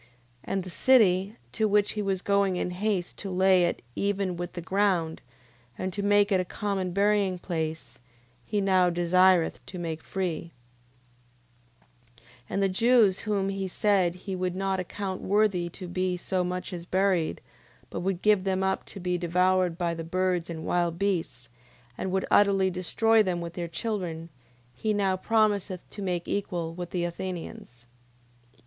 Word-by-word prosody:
9:14. 115 - -26 0.4
And 195 -1 -2
the 185 - -8
city, 200 - +4 0.2
to 220 -1 +1
which 205 0 +2
he 210 - -3
was 195 -2 -1
going 200 -2 +2
in 180 - -2
haste 190 -1 -2
to 200 - -5
lay 185 -1 +4
it 170 - -2
even 200 -2 -1
with 175 0 -5
the 180 - -5
ground, 185 -4 0 0.6
and 185 0 -3
to 205 - -3
make 205 0 +3
it 190 - +4
a - - -1
common 190 0 -3
burying 200 -1 +2
place, 160 -3 -4 0.4
he 205 - -1
now 185 -2 +4
desireth 175 0 +3
to 185 - -8
make 165 -2 -4
free: 170 -3 -4 1.6
9:15. - - -23 0.3
And 195 - 0
the 195 - +3
Jews, 225 -1 +4
whom 200 -3 -1
he 195 -1 -2
said 185 -2 +2
he 190 +1 -6
would 180 -1 -2
not 195 0 -1
account 190 +1 -4
worthy 195 -4 +1
to 180 +1 -9
be 185 +1 -1
so 185 +1 -1
much 180 +1 -4
as 175 -1 -7
buried, 185 -4 +1 0.5
but - - -4
would 185 -1 -2
give 210 -3 +4
them 190 0 0
up 190 0 -1
to - - -9
be 180 -1 -1
devoured 180 0 +2
by 175 -2 0
the 165 0 -5
birds 180 0 -1
and 160 -1 -6
wild 175 -1 0
beasts, 195 -3 -2 0.5
and 190 - -3
would 190 0 0
utterly 195 -2 +4
destroy 220 +5 +2
them 185 -4 0
with 170 0 -6
their 170 -1 -4
children, 170 -4 -4 0.4
he 210 - -1
now 195 -2 +1
promiseth 205 -2 0
to 205 - -8
make 180 -3 -2
equal 175 -5 -2
with 175 0 -6
the 175 -2 -2
Athenians. 170 -8 -6
185 Hz, 170 wpm, -27 LUFS, 175-200 Hz, 1.6 s, city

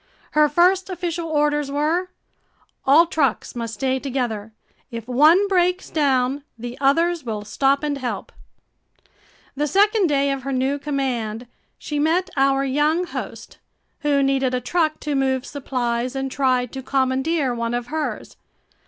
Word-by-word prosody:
Her 300 0 +4
first 365 +5 +3
official 345 -2 -3
orders 295 -1 +1
were: 315 +6 0 0.8
All 305 +5 +7
trucks 285 -9 -1
must 230 -1 -4
stay 265 +3 0
together. 245 -6 -3 0.4
If 230 -2 -7
one 310 +10 +5
breaks 365 -1 +1
down, 275 -2 +1 0.2
the 240 +1 -6
others 330 +4 +2
will 215 -3 -4
stop 275 +6 +1
and 290 -2 -1
help. 250 -2 -4 1.2
The 295 +2 0
second 410 +3 +3
day 280 -2 +1
of 275 -1 -3
her 275 +2 -4
new 265 +2 0
command, 250 -6 -2 0.3
she 295 -1 -4
met 350 +5 +1
our 275 0 +2
young 295 +6 +1
host, 345 - -7 0.4
who 285 -2 +2
needed 270 -2 +1
a - - 0
truck 310 +5 0
to 300 - -2
move 265 -1 0
supplies 250 -3 -2
and 270 0 -3
tried 255 -3 +1
to 265 - -6
commandeer 265 +2 0
one 235 0 -2
of 240 0 -3
hers. 315 -1 -4
275 Hz, 145 wpm, -22 LUFS, 255-310 Hz, 1.2 s, All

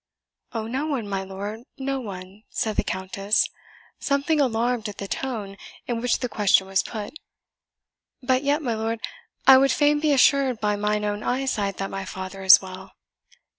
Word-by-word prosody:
"Oh, 225 -2 -3
no 265 +7 -2
one, 260 -8 -2
my 195 -1 -2
lord, 200 +3 -6 0.2
no 270 0 -2
one," 195 -3 -9
said 220 -2 -2
the - - +1
Countess, 195 +2 0 0.5
something 285 +2 +1
alarmed 235 -3 0
at 205 - -9
the 200 - -5
tone, 210 -5 -4 0.3
in 235 -2 -2
which 245 0 +1
the 250 - 0
question 205 -4 +3
was 190 0 +1
put; 215 +2 -6 1.1
"but 255 0 +1
yet, 290 +2 +1
my 240 -4 0
lord, 225 +1 -2 0.5
I 265 -1 +9
would 275 0 +3
fain 295 0 +3
be 305 0 +2
assured 270 -3 +4
by 210 -1 +1
mine 210 0 0
own 205 0 -2
eyesight 245 -6 -1
that 195 - -4
my 195 0 -4
father 190 +1 -7
is 190 0 +9
well." 190 +1 -10
220 Hz, 170 wpm, -24 LUFS, 195-265 Hz, 1.1 s, I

